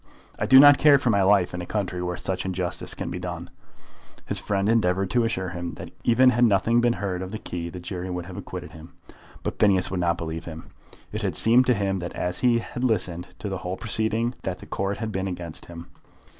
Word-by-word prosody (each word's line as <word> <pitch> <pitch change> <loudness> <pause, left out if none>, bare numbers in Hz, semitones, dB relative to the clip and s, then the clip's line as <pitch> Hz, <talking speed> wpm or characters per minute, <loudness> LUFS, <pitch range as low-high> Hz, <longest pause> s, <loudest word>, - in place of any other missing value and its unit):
I - - -1
do 130 - +9
not 145 0 +8
care 145 -2 +7
for 125 -3 +1
my 100 -2 +3
life 95 -2 +3
in 90 - -4
a - - -5
country 95 -4 -2
where 90 0 -3
such 90 +1 -2
injustice 90 -2 -2
can - - -5
be 90 - -4
done." 90 -1 -6 0.7
His - - -1
friend 100 -1 -1
endeavoured 95 -4 +1
to 120 -2 +2
assure 95 -5 -2
him 85 -1 -5
that - - -9
even 125 +2 +5
had 120 0 +2
nothing 115 +2 +3
been 120 0 +3
heard 95 -5 -3
of 95 0 -6
the 110 - -4
key 85 -4 -5
the 90 - -8
jury 90 +1 -5
would 90 -1 -4
have 90 0 -9
acquitted - - -7
him. 80 +2 -13 0.5
But - - -4
Phineas 95 -3 +3
would 95 - -2
not 85 -1 +1
believe 80 0 -5
him. 80 -1 -9 0.4
It - - -4
had - - -2
seemed 120 +3 +5
to 125 - +4
him 95 -2 -1
as 90 0 -3
he 120 -2 +3
had 120 +2 -5
listened 90 -7 -1
to - - -6
the 95 -2 -3
whole 90 +1 -4
proceeding 115 +2 0
that 95 -4 -3
the - - -12
Court 100 +1 -2
had 110 -1 -4
been 95 -1 -2
against 85 -4 -6
him. 85 0 -9
95 Hz, 230 wpm, -25 LUFS, 90-115 Hz, 0.7 s, do